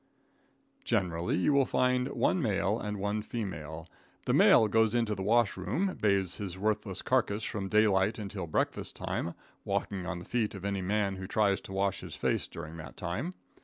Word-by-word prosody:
Generally, 85 -2 0
you 95 +11 +3
will 140 -2 +4
find 125 0 +2
one 175 +5 +1
male 105 -1 +1
and 105 -2 -3
one 105 +2 -1
female. 80 -8 -5 0.4
The - - +1
male 110 - +7
goes 110 +2 +3
into 115 -3 +1
the 95 - -5
wash 115 +2 +3
room, 180 - -1
bathes 100 -4 +2
his 95 -3 -5
worthless 105 -1 -1
carcass 110 -5 +1
from 100 -2 -3
daylight 105 -1 +3
until 100 -4 -5
breakfast 80 - -1
time, 85 - -3 0.3
walking 95 -3 -2
on 90 - -3
the 85 - -8
feet 115 -4 -1
of 95 0 -7
any 100 -1 -1
man 100 0 0
who 95 0 -6
tries 100 -2 +2
to - - -11
wash 100 0 0
his - - -8
face - - 0
during 80 +2 -8
that 75 -2 -9
time. 115 - -3
100 Hz, 180 wpm, -30 LUFS, 95-110 Hz, 0.4 s, male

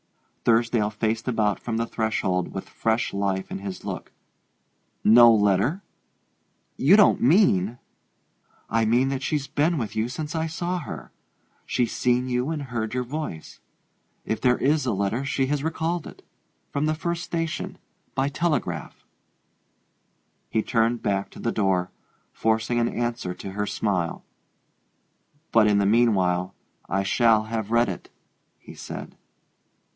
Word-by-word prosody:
Thursdale 115 -2 +2
faced 110 +2 -2
about 110 -4 +1
from 115 -2 -3
the 115 - 0
threshold 95 -6 -1
with 95 - -6
fresh 110 +1 -1
life 100 -1 -1
in - - -4
his 95 -1 -7
look. - - -5 0.9
"No 120 +2 +8
letter? 105 - +2 0.9
You 170 +10 +5
don't 210 - +5
mean 120 - +4 0.5
" - - -39
"I 115 +1 +2
mean 120 +4 +3
that 135 -1 -2
she's 140 0 -1
been 155 +4 +1
with 115 -6 -4
you 110 +2 0
since 150 +4 -5
I 160 0 -1
saw 175 +2 -2
her 150 - -8 0.6
she's 120 -2 0
seen 125 +1 +1
you 125 +2 0
and 155 -3 -3
heard 120 -3 -3
your 125 - 0
voice. 130 - -6 0.7
If 110 - -2
there 125 -1 +3
is 145 0 +1
a 115 - +1
letter, 100 +6 -1
she 135 -1 0
has 145 +1 -1
recalled 165 +1 -2
it - - -13 0.5
from 145 +2 0
the 155 - +1
first 170 +2 -3
station, 165 -2 -3 0.4
by 135 0 +1
telegraph." 140 - -2 1.4
He 110 - 0
turned 115 0 +1
back 100 0 0
to - - -13
the 115 - -1
door, 95 -4 0 0.4
forcing 115 +2 +1
an 120 0 +2
answer 120 -7 -3
to 95 - -7
her 105 +1 -2
smile. 95 -7 -2 1.3
"But 110 -2 +5
in 105 -1 +3
the 100 - +2
mean 115 +2 +4
while 90 -1 0 0.3
I 95 +1 +1
shall 110 +1 +3
have 110 -1 -4
read 115 +1 +3
it," 95 - -6 0.5
he - - -13
said. - - -8
115 Hz, 150 wpm, -25 LUFS, 105-135 Hz, 1.4 s, No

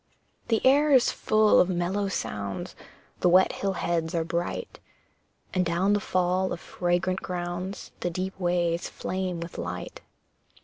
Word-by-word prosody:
The 225 +1 +1
air 290 +3 +5
is 260 -3 +5
full 215 0 +4
of 180 - +4
mellow 185 +3 0
sounds, 105 - -4 0.5
The 180 - +3
wet 185 +2 +5
hill 195 -1 -1
heads 170 -1 -1
are 165 - +1
bright, 170 - -3 0.7
And 185 - +2
down 175 +4 +1
the 205 - +3
fall 185 0 0
of - - -3
fragrant 175 +3 -1
grounds, 180 +2 -5
The 175 - -1
deep 185 +2 -4
ways 175 -1 0
flame 185 -2 -3
with 170 0 -7
light. 90 +1 -5
180 Hz, 145 wpm, -27 LUFS, 170-190 Hz, 0.7 s, air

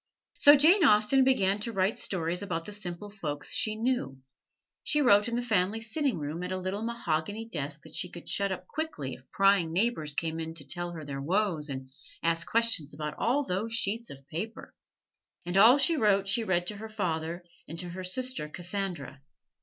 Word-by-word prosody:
So 290 +1 +9
Jane 335 +7 +5
Austen 240 +1 +5
began 205 -7 +2
to 230 +3 -3
write 195 0 0
stories 175 -1 -2
about 165 -5 -3
the - - -8
simple 205 0 -6
folks 150 -8 -5
she 215 -1 +1
knew. 220 - -1 0.7
She 300 - +1
wrote 210 -7 +5
in 235 - -2
the 245 - -1
family 210 -2 +1
sitting 255 - -1
room 155 +2 -4
at 180 +1 -4
a 185 - -1
little 185 +3 -3
mahogany 220 -2 -2
desk 150 -6 -5
that 160 - -11
she 180 - -2
could 170 -1 -11
shut 200 -1 0
up 185 -1 -5
quickly 280 - -4
if 130 0 -14
prying 195 -4 +3
neighbors 170 -6 0
came 160 0 -2
in 160 0 -5
to 145 -4 -5
tell 175 +2 -3
their 140 -1 -5
woes 170 -2 0
and 130 -1 -6 0.3
ask 165 0 +1
questions 225 -11 +2
about 150 -1 -4
all 265 +5 +2
those 215 +1 -2
sheets 230 +1 -1
of 135 0 -12
paper! 175 +9 -6 0.7
And 175 +1 -3
all 225 +7 +8
she 330 +4 +4
wrote 200 -7 +2
she 225 +4 +2
read 175 -4 +1
to 205 +3 -2
her 220 +2 -8
father 175 -4 -3 0.2
and 165 - -7
to 175 +1 -5
her 185 +2 -6
sister 250 -3 -2
Cassandra. 175 -5 -5
190 Hz, 195 wpm, -29 LUFS, 165-225 Hz, 0.7 s, So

